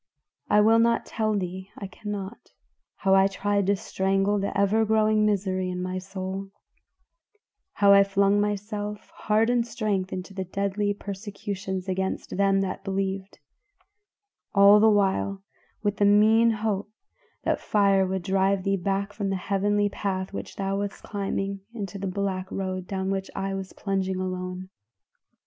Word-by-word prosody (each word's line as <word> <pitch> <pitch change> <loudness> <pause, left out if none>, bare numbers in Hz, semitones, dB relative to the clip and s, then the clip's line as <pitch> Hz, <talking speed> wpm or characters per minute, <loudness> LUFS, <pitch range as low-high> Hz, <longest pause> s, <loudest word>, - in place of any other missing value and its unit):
I 210 - +5
will 225 +2 +5
not 230 0 +2
tell 215 -2 -1
thee 185 0 -5
I 200 - -6
cannot 205 +2 -7 0.4
how 190 -1 +1
I 195 0 +6
tried 200 0 0
to 200 - +4
strangle 195 +2 0
the 200 0 -2
ever 205 +3 +3
growing 215 0 +3
misery 190 -2 0
in 180 0 -4
my 185 +1 -3
soul; 190 +1 -5 1.2
how 200 -1 +5
I 200 0 +8
flung 200 +1 +2
myself, 210 0 -3
heart 220 +2 +1
and 245 -1 +2
strength, 210 -5 -2
into 185 +1 -6
the 190 -1 -3
deadly 200 +2 -1
persecutions 200 -2 -5
against 190 0 -2
them 195 0 +3
that 190 -1 -3
believed; 195 0 -3 1.2
all 200 +1 +8
the 220 +1 +6
while 195 -1 +1 0.4
with 205 -1 0
the 205 - +3
mean 215 +3 +5
hope 210 -2 -1 0.5
that - - +1
the - - -18
fire 200 -2 +3
would 190 -1 -2
drive 195 0 +1
thee 195 0 +1
back 195 +2 -2
from 205 -2 -2
the 195 - 0
heavenly 205 +2 +1
path 195 -1 -3
which - - -6
thou 195 0 -1
wast 200 -1 -5
climbing 195 -1 -3 0.2
into 200 -3 -5
the 195 - -3
black 190 -1 -3
road 185 -1 -3
down 190 0 -2
which 195 0 -3
I 195 0 -2
was 190 -1 -5
plunging 190 -2 -2
alone. 185 0 -4
195 Hz, 155 wpm, -26 LUFS, 190-205 Hz, 1.2 s, I